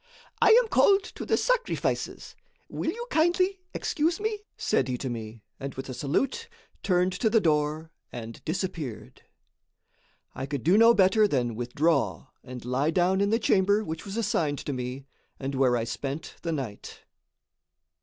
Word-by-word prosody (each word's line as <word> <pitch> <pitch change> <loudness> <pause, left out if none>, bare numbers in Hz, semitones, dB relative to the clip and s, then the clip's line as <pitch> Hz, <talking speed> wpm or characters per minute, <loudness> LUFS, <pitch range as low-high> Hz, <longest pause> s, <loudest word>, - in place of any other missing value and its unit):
"I - - +6 0.2
am - - -7
called 400 -2 +4
to - - -8
the - - +2
sacrifices. - - -1 0.3
Will - - -2
you 475 +2 -4
kindly 365 +4 +2
excuse 325 +1 0
me?" 430 0 -2 0.2
said 130 - +1
he 125 -1 -2
to 130 0 -4
me, 110 -1 -7 0.2
and 140 0 -6
with 135 +1 -6
a - - -4
salute, 260 - -1 0.3
turned 180 -1 +2
to 220 +5 +1
the 225 +1 +4
door 155 -2 0 0.2
and 115 -2 -8
disappeared. 160 - -4 1.1
I 130 +1 -5
could 140 -4 -4
do 175 +5 +4
no 230 +2 +7
better 205 +2 +5
than 125 - 0
withdraw 135 +4 0
and 125 -2 -9
lie 130 +5 +1
down 180 +3 +2
in 200 - +2
the 225 - +3
chamber 205 -1 +2
which 160 -3 -5
was 200 +1 -6
assigned 165 -10 0
to 145 - -2
me 125 +1 -5 0.3
and 135 0 -4
where 130 -2 +3
I 115 - -1
spent 140 +6 -5
the 170 - -2
night. 130 -10 -6
160 Hz, 165 wpm, -27 LUFS, 130-215 Hz, 1.1 s, no